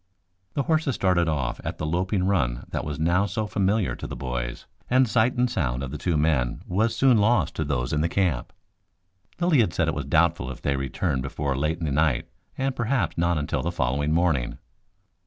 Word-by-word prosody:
The 140 - +1
horses 155 -3 +1
started 90 -3 +2
off 65 -6 -2
at - - -4
the 75 - -3
loping 90 +4 0
run 70 -12 0
that - - -2
was 75 -2 -4
now 85 +5 +2
so 105 +3 -2
familiar 100 0 0
to - - -7
the - - -6
boys, - - -4 0.2
and 130 +1 +4
sight 115 +2 +2
and 125 +1 +3
sound 65 - -1
of 65 - -5
the 75 - -4
two 85 0 0
men 75 -5 +1
was 110 +5 0
soon 130 -3 +4
lost 105 - +2
to 80 - 0
those 70 -4 -1
in 75 - +1
the 85 - +1
camp. 85 -9 0 0.9
Lilly 175 -5 +3
had 95 -7 +2
said 80 - +1
it 80 - +1
was 70 -3 -3
doubtful 80 -2 +2
if 65 - -7
they 70 - 0
returned 65 -1 -1
before 70 +1 -2
late 75 +5 0
in 85 - -4
the 75 - -1
night, 75 -3 +1 0.3
and 135 0 -1
perhaps 115 -8 0
not 85 0 +1
until 75 -1 -1
the - - -2
following 70 +4 0
morning. 80 -7 +1
80 Hz, 210 wpm, -25 LUFS, 70-100 Hz, 0.9 s, and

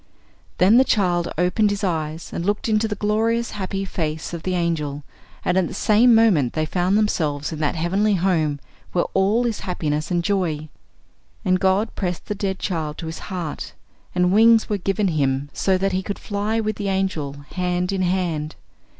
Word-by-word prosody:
Then 195 +6 +5
the - - +7
child 175 -8 +1
opened 180 +5 +2
his 205 +1 -3
eyes 160 -3 -2
and 170 - -3
looked 205 +4 -1
into 220 0 +2
the 210 - -3
glorious 225 +3 0
happy 195 0 -3
face 160 -3 -3
of 170 - -4
the 185 +1 -2
angel, 150 -4 -1 0.4
and 180 +1 +3
at 180 - +1
the - - -7
same 230 +2 +5
moment 185 - +4
they 155 0 0
found 180 +5 +1
themselves 155 -9 0
in 155 - -5
that 155 +2 0
heavenly 195 +6 +1
home 165 -5 +1 0.3
where 175 - +2
all 205 +5 +2
is 230 -3 -1
happiness 155 -4 -2
and 175 -2 0
joy. 170 -6 -1 0.8
And 185 -1 +3
God 190 +4 +1
pressed 180 -3 -3
the 210 - -2
dead 195 -2 -2
child 155 -4 -3
to - - -6
His 160 0 -6
heart, 175 -6 -5 0.4
and 180 0 +3
wings 225 +1 +6
were 205 -2 -1
given 195 +1 0
him 140 -2 0
so 190 -1 +1
that 195 +1 0
he 185 0 0
could 200 +2 -4
fly 210 +2 -2
with 215 -1 -2
the 200 -1 -2
angel, 190 -7 -1 0.2
hand 180 0 -1
in 195 -1 -1
hand. 175 -4 -1
185 Hz, 185 wpm, -22 LUFS, 160-205 Hz, 0.8 s, the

